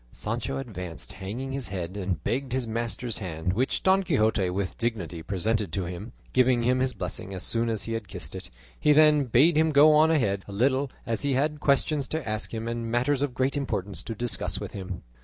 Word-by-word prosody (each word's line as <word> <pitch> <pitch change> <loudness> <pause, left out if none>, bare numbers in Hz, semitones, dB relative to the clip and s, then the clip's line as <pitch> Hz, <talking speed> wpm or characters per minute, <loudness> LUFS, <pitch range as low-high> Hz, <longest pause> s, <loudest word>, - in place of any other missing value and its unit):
Sancho 120 +5 -3
advanced 90 -10 -6
hanging 120 +8 -5
his 135 -2 -3
head 95 -1 -5
and 95 -6 -3
begged 130 0 -1
his 130 -2 0
master's 115 +1 -3
hand, 90 -2 -2
which 125 +6 0
Don 190 +1 +5
Quixote 110 - +2
with 95 +1 -2
dignity 95 -8 -2
presented 100 +2 -1
to 95 -2 -1
him, 90 +6 -6 0.2
giving 125 -2 +4
him 125 +2 +2
his 130 0 +1
blessing 95 - -4
as 90 - -4
soon 115 0 +1
as 110 -4 -1
he 115 - -4
had 115 -3 -4
kissed - - -6
it; - - -7 0.3
he 150 - +5
then 150 -1 +5
bade 135 +8 +4
him 160 0 +4
go 150 +2 +7
on 155 +1 +6
ahead 100 -11 +1
a - - -8
little, 130 +6 +1 0.2
as 115 -1 -1
he 140 -1 +1
had 150 +3 0
questions 140 0 +2
to 160 -4 -4
ask 110 0 -2
him 115 0 -4
and 115 -1 -3
matters 125 +4 +1
of 140 -4 -1
great 130 +2 +1
importance 100 - -2
to 115 - -6
discuss 100 -5 -1
with 100 - -6
him. 95 -2 -6
115 Hz, 215 wpm, -27 LUFS, 100-135 Hz, 0.3 s, go